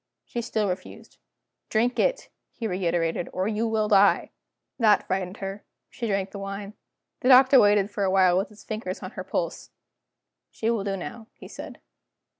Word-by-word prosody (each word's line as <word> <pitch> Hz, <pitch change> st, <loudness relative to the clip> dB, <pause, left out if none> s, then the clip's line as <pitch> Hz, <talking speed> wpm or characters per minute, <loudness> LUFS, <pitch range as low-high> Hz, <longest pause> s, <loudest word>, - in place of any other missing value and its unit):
She 240 Hz, -, -4 dB
still 220 Hz, -3 st, -1 dB
refused. 185 Hz, 0 st, -7 dB, 0.5 s
"Drink 235 Hz, +3 st, +1 dB
it," -, -, 0 dB, 0.2 s
he 230 Hz, -, -7 dB
reiterated, 175 Hz, -4 st, -1 dB
"or 185 Hz, +2 st, -1 dB
you 220 Hz, +1 st, 0 dB
will 220 Hz, -1 st, 0 dB
die." 200 Hz, -1 st, +4 dB, 0.5 s
That 215 Hz, -3 st, +4 dB
frightened 190 Hz, 0 st, -2 dB
her; 195 Hz, +1 st, -6 dB, 0.3 s
she 235 Hz, -, -4 dB
drank 195 Hz, -2 st, -1 dB
the 200 Hz, -, -7 dB
wine. 195 Hz, +1 st, -6 dB, 0.5 s
The 255 Hz, -, +1 dB
Doctor 260 Hz, +1 st, +8 dB
waited 205 Hz, -1 st, +4 dB
for 205 Hz, 0 st, -2 dB
a 190 Hz, -, +2 dB
while 185 Hz, -2 st, +4 dB
with 190 Hz, +2 st, 0 dB
his 210 Hz, -1 st, -16 dB
fingers 215 Hz, -4 st, -5 dB
on 185 Hz, -, -6 dB
her 185 Hz, -, -6 dB
pulse. 170 Hz, -2 st, -3 dB, 0.8 s
"She 225 Hz, +1 st, -1 dB
will 225 Hz, -4 st, -1 dB
do 195 Hz, -1 st, -2 dB
now," 220 Hz, +5 st, -8 dB
he -, -, -12 dB
said. -, -, -10 dB
200 Hz, 175 wpm, -26 LUFS, 190-220 Hz, 0.8 s, Doctor